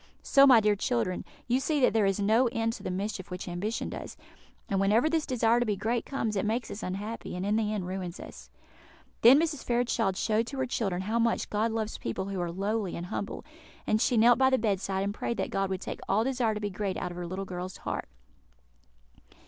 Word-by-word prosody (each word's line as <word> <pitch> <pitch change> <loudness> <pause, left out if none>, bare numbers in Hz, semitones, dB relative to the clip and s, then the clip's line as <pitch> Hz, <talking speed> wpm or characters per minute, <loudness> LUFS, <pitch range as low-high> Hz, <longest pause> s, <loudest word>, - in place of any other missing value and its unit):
So, 275 0 +6
my 250 -4 +8
dear 210 -1 +3
children, 180 - -1 0.2
you 250 +2 +2
see 300 +2 0
that 250 - +4
there 215 -3 +3
is 195 +1 0
no 220 +5 +3
end 225 -1 -1
to - - -8
the - - -4
mischief 195 +1 -4
which 180 +1 -6
ambition 185 +6 -3
does; - - -7 0.5
and 195 - 0
whenever 210 +8 +3
this 320 -2 0
desire 235 -2 +3
to 240 - +1
be 210 - +1
great 230 +4 -1
comes, 225 -6 -2
it 195 - 0
makes 225 +3 -1
us 210 - -6
unhappy, 205 +4 -5
and 180 +1 -3
in 205 +1 +1
the 215 -1 +1
end 205 -4 -2
ruins 180 -1 -5
us." - - -11 0.7
Then 250 +5 +8
Mrs. 315 -4 -1
Fairchild 235 -5 0
showed 220 +1 +1
to 275 - -6
her 260 - 0
children 195 -7 -2
how 220 +4 0
much 230 0 0
God 215 +2 +1
loves 220 -1 -3
people 115 +11 -3
who 195 -2 -3
are 175 -1 -2
lowly 200 +1 -2
and 170 - -5
humble; 200 - -4 0.4
and 215 0 +1
she 245 - +2
knelt 235 +2 +6
by 265 0 +5
the 260 - +3
bedside 195 -3 0
and 200 0 -2
prayed 235 +2 -3
that - - -2
God 195 -1 0
would 190 -1 -3
take - - -5
all 205 +3 +3
desire 245 -4 0
to - - -3
be 205 -1 -3
great 195 0 -3
out 180 - -3
of - - -8
her - - -4
dear 175 - -4
little 190 +2 -4
girls' 180 0 -6
hearts. - - -4
215 Hz, 235 wpm, -29 LUFS, 190-235 Hz, 0.7 s, my